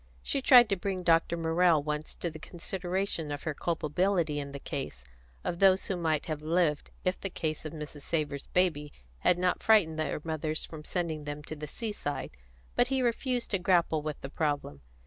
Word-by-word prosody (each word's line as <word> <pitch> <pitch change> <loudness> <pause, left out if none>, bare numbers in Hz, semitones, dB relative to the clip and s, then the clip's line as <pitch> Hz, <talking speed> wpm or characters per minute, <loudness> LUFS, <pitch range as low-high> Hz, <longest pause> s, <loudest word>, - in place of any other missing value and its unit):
She 275 - -1
tried 250 -3 +8
to 200 - +2
bring 185 0 -3
Dr. 170 0 +3
Morrell 165 -1 +3
once 150 +1 -3
to 170 - -3
the 155 - -9
consideration 175 -1 -3
of 145 - -4
her 160 - -1
culpability 165 0 0
in 140 -1 -5
the 140 - -6
case 135 - -5 0.4
of 170 - -2
those 190 -1 +5
who 190 - -1
might 160 -4 0
have 155 -3 -3
lived 160 -1 +1 0.2
if 185 0 0
the 195 - -2
case 155 -3 -3
of 155 - -5
Mrs. 150 -2 -7
Savor's 145 -2 -2
baby 155 -5 +1 0.3
had 175 - +3
not 180 0 +1
frightened 180 -8 +4
their 155 - -1
mothers 155 -1 -2
from 155 -2 -9
sending 160 -3 -2
them 145 0 -5
to 155 - -6
the 150 0 -6
seaside; 205 -6 -4 0.4
but 245 - +4
he 265 0 +1
refused 245 +1 0
to 195 - +2
grapple 170 -3 +3
with 150 -1 -4
the 135 - -6
problem. 145 - -2
165 Hz, 190 wpm, -30 LUFS, 150-185 Hz, 0.4 s, tried